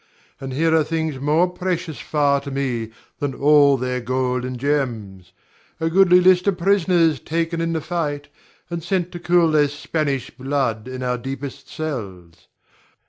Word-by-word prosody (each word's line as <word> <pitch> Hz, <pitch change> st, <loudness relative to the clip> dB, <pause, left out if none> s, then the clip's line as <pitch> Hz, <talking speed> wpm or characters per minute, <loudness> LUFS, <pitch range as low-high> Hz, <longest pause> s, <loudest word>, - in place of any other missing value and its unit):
And 135 Hz, -1 st, -6 dB
here 160 Hz, +4 st, +2 dB
are 160 Hz, -, +4 dB
things 160 Hz, -3 st, -2 dB
more 155 Hz, +6 st, +2 dB
precious 180 Hz, -3 st, -3 dB
far 145 Hz, -2 st, +1 dB
to 140 Hz, -, -7 dB
me 130 Hz, -5 st, -2 dB, 0.3 s
than 145 Hz, -3 st, -2 dB
all 145 Hz, -1 st, +5 dB
their 125 Hz, 0 st, -2 dB
gold 125 Hz, +1 st, -1 dB
and 125 Hz, -1 st, -5 dB
gems, 115 Hz, -10 st, -2 dB, 0.5 s
a 165 Hz, 0 st, -1 dB
goodly 180 Hz, 0 st, +6 dB
list 180 Hz, +1 st, +4 dB
of 195 Hz, -3 st, +2 dB
prisoners 175 Hz, -5 st, +2 dB
taken 165 Hz, +1 st, -2 dB
in 165 Hz, 0 st, -1 dB
the 160 Hz, -, -1 dB
fight, 150 Hz, -3 st, -3 dB, 0.4 s
and 170 Hz, -1 st, -3 dB
sent 180 Hz, 0 st, -1 dB
to 175 Hz, -, -7 dB
cool 170 Hz, -1 st, +3 dB
their 150 Hz, -1 st, +4 dB
Spanish 145 Hz, -2 st, -3 dB
blood 130 Hz, -4 st, -2 dB
in 130 Hz, 0 st, -6 dB
our 125 Hz, -1 st, -1 dB
deepest 135 Hz, +1 st, -7 dB
cells. 95 Hz, -, -6 dB
145 Hz, 160 wpm, -21 LUFS, 130-165 Hz, 0.5 s, goodly